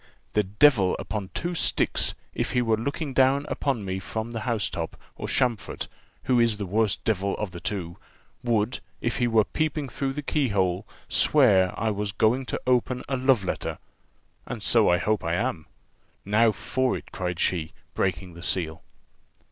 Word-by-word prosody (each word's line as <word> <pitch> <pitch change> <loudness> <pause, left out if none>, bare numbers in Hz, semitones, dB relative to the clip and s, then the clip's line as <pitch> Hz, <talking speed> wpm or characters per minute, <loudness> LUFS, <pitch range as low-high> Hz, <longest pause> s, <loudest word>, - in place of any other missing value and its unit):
"The 105 - +4
devil 105 0 +4
upon 100 -3 -4
two 175 +1 -2
sticks, 170 - +1 0.2
if - - -2
he 125 - +3
were 115 -1 +3
looking 140 +5 -3
down 135 +2 +4
upon 125 -8 -1
me 95 0 -2
from 110 +4 -4
the 115 - -3
house 115 -2 0
top, - - -5 0.2
or - - -5
Champfort, 125 -5 0 0.4
who 125 -2 +3
is 115 -3 +3
the 100 - -3
worse 105 +2 +2
devil 100 -2 -1
of 105 -3 -4
the 85 - -7
two, 85 -2 -4 0.5
would, 115 -1 +1 0.2
if 120 - -1
he 120 -2 +2
were 115 -2 +4
peeping 150 +1 -2
through 135 +2 -2
the 150 +1 -4
keyhole, 100 - 0 0.2
swear 100 -11 +4
I 110 -1 +1
was 105 -1 -3
going 120 +6 +2
to - - -2
open 125 0 +1
a 135 - 0
love 130 -4 +3
letter 95 - -3 0.7
and 115 -3 -5
so 115 -1 +4
I 90 - +5
hope 110 +3 0
I 85 +1 0
am. 95 -7 -2 0.6
Now 110 +3 +4
for 130 +5 0
it!" - - -12
cried 90 -2 -3
she, 80 -4 0 0.2
breaking 95 -1 -1
the 85 - -11
seal. 85 -3 -2
110 Hz, 175 wpm, -26 LUFS, 95-125 Hz, 0.7 s, I